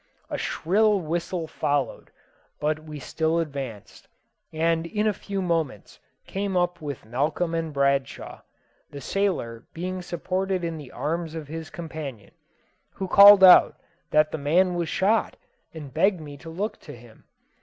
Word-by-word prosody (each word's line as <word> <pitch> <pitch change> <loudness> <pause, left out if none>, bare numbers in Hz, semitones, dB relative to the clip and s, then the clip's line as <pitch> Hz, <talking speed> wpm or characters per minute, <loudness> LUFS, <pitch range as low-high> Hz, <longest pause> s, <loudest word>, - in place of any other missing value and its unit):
A - - -2
shrill 210 +4 +2
whistle 170 +1 -3
followed; 145 -5 -2 0.5
but 155 +1 0
we 155 -1 -8
still 160 +4 -1
advanced, 140 -10 -5 0.4
and 165 +1 0
in 210 +4 -1
a 215 - +2
few 195 0 -4
moments 165 - -2 0.3
came 195 -1 -2
up 175 -1 0
with 145 -6 -6
Malcolm 150 +8 -1
and 165 -1 -2
Bradshaw, 140 -1 -1 0.5
the 145 - -9
sailor 140 - -2
being 185 +2 -4
supported 185 +2 -2
in 165 -2 -3
the 140 -4 -11
arms 165 +1 -3
of 155 -3 -7
his 160 0 -6
companion, 155 - -8 0.6
who 190 - -4
called 200 +1 +9
out 185 -1 +8 0.3
that 155 0 +3
the 160 - -4
man 175 +6 +2
was 170 -2 -2
shot, 210 +4 +1 0.3
and 150 -5 -9
begged 185 +3 +2
me 145 -2 -9
to 165 +4 -11
look 195 +7 -4
to - - -11
him. 115 -1 -17
165 Hz, 150 wpm, -25 LUFS, 145-185 Hz, 0.6 s, called